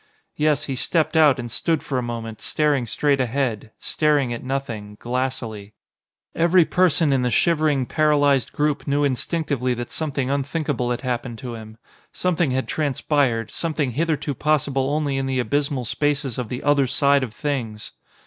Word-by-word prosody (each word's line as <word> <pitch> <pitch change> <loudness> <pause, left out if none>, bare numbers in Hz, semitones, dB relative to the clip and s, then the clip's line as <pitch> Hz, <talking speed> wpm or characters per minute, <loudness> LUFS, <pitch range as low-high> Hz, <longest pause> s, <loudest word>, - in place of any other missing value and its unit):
Yes, 150 -1 +2
he 135 - -3
stepped 160 +5 0
out 155 -4 +6
and 120 -2 -5
stood 165 +5 0
for 130 -3 -1
a - - -1
moment 115 -2 -5
staring 145 -5 +1
straight 140 +4 +1
ahead, 120 -4 -1
staring 145 -5 +1
at 120 - -6
nothing, 115 -6 -4
glassily. 120 -4 -3 0.6
Every 170 +1 +4
person 170 -5 +3
in 135 - +2
the 125 - +1
shivering, 150 +1 +2
paralysed 145 -3 +2
group 150 0 -1
knew 145 +1 +2
instinctively 140 -2 -1
that 120 0 -6
something 140 -4 -2
unthinkable 140 -2 -1
had 120 - -2
happened 120 -2 -3
to 120 0 -6
him. 110 -1 -10 0.3
Something 175 -4 0
had 130 +1 -1
transpired, 140 -6 0
something 155 -5 -1
hitherto 150 +1 -1
possible 140 -2 +1
only 145 -2 0
in 135 0 -1
the 130 -1 -1
abysmal 135 +2 0
spaces 145 -1 -1
of 120 -4 -4
the 125 - -5
Other 145 -2 +3
Side 140 +2 +3
of 130 -4 -3
Things. 120 -8 -3
135 Hz, 160 wpm, -22 LUFS, 125-150 Hz, 0.6 s, out